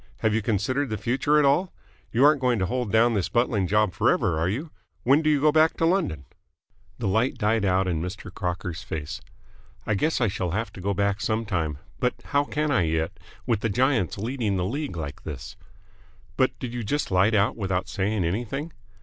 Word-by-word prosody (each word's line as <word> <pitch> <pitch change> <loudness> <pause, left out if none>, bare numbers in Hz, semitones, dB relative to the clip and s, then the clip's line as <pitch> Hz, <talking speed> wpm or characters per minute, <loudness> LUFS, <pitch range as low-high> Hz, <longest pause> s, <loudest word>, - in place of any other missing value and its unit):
Have 110 -1 +2
you 110 - +1
considered 115 +7 0
the 110 - -2
future 135 +6 +1
at 150 - +4
all? 170 +7 +2 0.4
You 125 +4 +4
aren't 150 -2 +5
going 125 -2 +2
to 95 - 0
hold 120 +2 -2
down 115 +2 +4
this 100 -5 0
buttling 115 -5 +1
job 105 -1 +2
forever, 80 - +2
are 85 +3 +1
you? 145 - -4 0.3
When 140 +5 +4
do 155 - +2
you 150 -2 +3
go 150 +2 +4
back 155 +1 +3
to 165 - +2
London?" 165 - 0 0.7
The 115 - -2
light 110 +8 +1
died 110 -2 +1
out 95 0 +2
of 90 - 0
Mr. 90 +4 -6
Crocker's 90 -2 -3
face. 75 -5 -5 0.6
"I - - +1
guess 155 +11 +1
I 120 - +3
shall 90 -2 -2
have 115 +1 -3
to 95 - -9
go 100 +1 -1
back 100 +1 0
some 110 +1 0
time. 80 -8 -1 0.2
But 125 - +1
how 145 0 +1
can 150 +1 -1
I 115 - +3
yet, 80 +3 -1 0.3
with 115 -4 +1
the 115 - -1
Giants 125 - +1
leading 110 -1 -1
the 90 -1 0
league 135 - -3
like 70 -3 -6
this?" 70 -6 -7 0.8
"But - - +1
did 120 -1 -6
you 120 -1 -3
just 145 +4 -1
light 95 +4 +4
out 100 +1 +2
without 95 -4 -2
saying 100 -1 -1
anything?" 120 - -3
110 Hz, 210 wpm, -25 LUFS, 95-130 Hz, 0.8 s, aren't